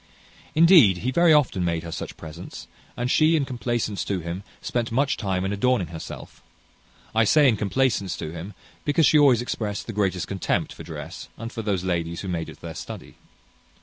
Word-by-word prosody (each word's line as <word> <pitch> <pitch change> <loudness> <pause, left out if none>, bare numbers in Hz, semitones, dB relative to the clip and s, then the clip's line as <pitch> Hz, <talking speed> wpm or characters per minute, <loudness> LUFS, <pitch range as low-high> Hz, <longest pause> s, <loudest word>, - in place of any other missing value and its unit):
Indeed, 160 - +7
he 130 - +1
very 170 +4 +4
often 140 -11 +3
made 85 -1 -1
her 85 - -7
such - - -6
presents; 80 +3 -9 0.3
and 125 +1 -1
she, 160 +1 +4
in 145 -3 +1
complacence 120 -5 -2
to 100 -2 -1
him, 85 +2 -5 0.2
spent 120 -2 -2
much 140 +4 +1
time 95 -3 -2
in 95 - -1
adorning 100 -5 +1
herself. 80 -1 -9 0.7
I 110 +1 +4
say 145 +6 +5
in 120 - +4
complacence 105 -2 0
to 75 - -5
him, 85 +5 -8 0.3
because 150 +2 +3
she 150 +3 +5
always 130 -5 +5
exprest 105 -4 -3
the 115 - -6
greatest 95 -3 0
contempt 95 -2 -1
for - - -11
dress, - - -8
and 115 +1 -6
for 115 - -5
those 100 -4 -1
ladies 85 -2 -2
who 95 - -5
made 85 -2 -3
it - - -13
their - - -7
study. - - -8
105 Hz, 190 wpm, -24 LUFS, 90-130 Hz, 0.7 s, Indeed